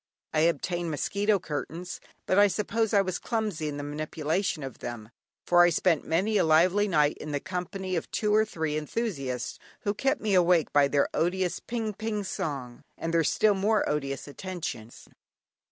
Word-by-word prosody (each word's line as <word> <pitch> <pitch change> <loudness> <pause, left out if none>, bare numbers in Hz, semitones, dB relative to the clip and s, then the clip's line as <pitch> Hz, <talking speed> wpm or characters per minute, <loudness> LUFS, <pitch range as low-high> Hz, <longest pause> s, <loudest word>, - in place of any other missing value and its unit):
I 155 - +2
obtained 170 +2 +1
mosquito 200 +7 +1
curtains, 170 +1 -5 0.2
but 185 - +3
I 205 - +7
suppose 220 +2 0
I 200 -3 +4
was 185 -2 -3
clumsy 210 -9 -2
in 145 -1 -4
the 145 - -4
manipulation 155 +3 -2
of 135 -3 -7
them, 115 -2 -7 0.3
for 175 0 +5
I 175 - +7
spent 170 -1 +2
many 190 +7 +1
a - - +4
lively 175 +6 +4
night 150 -5 +2
in 150 -1 -6
the 145 - 0
company 185 +2 -4
of 165 - -3
two 210 -1 0
or 215 +1 +5
three 160 -7 -2
enthusiasts 145 - -3 0.2
who 205 -2 0
kept 270 +6 0
me 215 -2 0
awake 175 -3 +4
by 145 -1 +5
their 140 0 +2
odious 180 +1 0
"ping 225 -3 -3
ping" 210 0 -3
song, 135 -9 -4
and 165 0 -3
their 165 -1 +4
still 210 +7 +3
more 210 +3 +1
odious 140 -2 -2
attentions. 165 - -6
175 Hz, 175 wpm, -28 LUFS, 150-205 Hz, 0.3 s, I